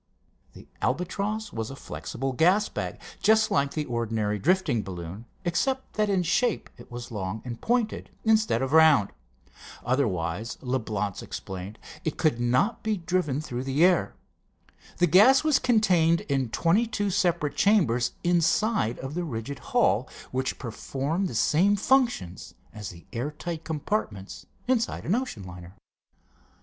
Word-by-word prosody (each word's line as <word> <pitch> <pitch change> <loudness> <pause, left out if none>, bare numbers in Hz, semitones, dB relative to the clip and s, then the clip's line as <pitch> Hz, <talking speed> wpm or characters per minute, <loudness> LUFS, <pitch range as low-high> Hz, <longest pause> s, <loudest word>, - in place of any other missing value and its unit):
The - - -14
Albatross 200 +9 -2
was 110 -1 -3
a 135 - -7
flexible 135 -1 -5
gas 180 +10 +3
bag, - - -5 0.2
just 220 0 +4
like 140 0 +1
the 155 -1 -1
ordinary 110 -4 -1
drifting 170 - +2
balloon, 90 +2 -7 0.2
except 265 +10 -1
that 210 -1 +1
in 190 -3 +2
shape 215 +7 0
it - - -14
was 120 0 -7
long 105 0 -4
and 120 -2 -6
pointed, 235 -2 0 0.2
instead 215 - +3
of 135 +2 -2
round. 155 -10 +6 0.7
Otherwise, 110 -5 -1
Leblance 110 -6 -2
explained, 95 +3 -7 0.3
it 160 - -2
could 150 -8 +1
not 125 - +1
be 220 -1 -1
driven 165 -5 -1
through 125 -5 -4
the 135 +5 +3
air. 180 -2 +2 0.8
The 175 - +4
gas 210 - +6
was 310 -3 +3
contained 180 -8 +3
in 135 -4 -1
twenty 175 - +2
two 205 -3 -1
separate 175 -6 +1
chambers 145 - +3
inside 175 - +2
of 135 +2 -6
the 175 +2 -2
rigid 135 -2 -5
hull, 245 - +1 0.2
which 130 0 -2
performed 140 - -3
the 145 - -6
same 180 - +3
functions 235 - 0 0.2
as 105 -3 -6
the 85 -1 -13
air 125 +5 -2
tight 165 +1 -6
compartments 150 - -4 0.2
inside 245 -2 0
an 180 - +1
ocean 235 - -2
liner. 90 0 -10
150 Hz, 145 wpm, -26 LUFS, -, 0.8 s, round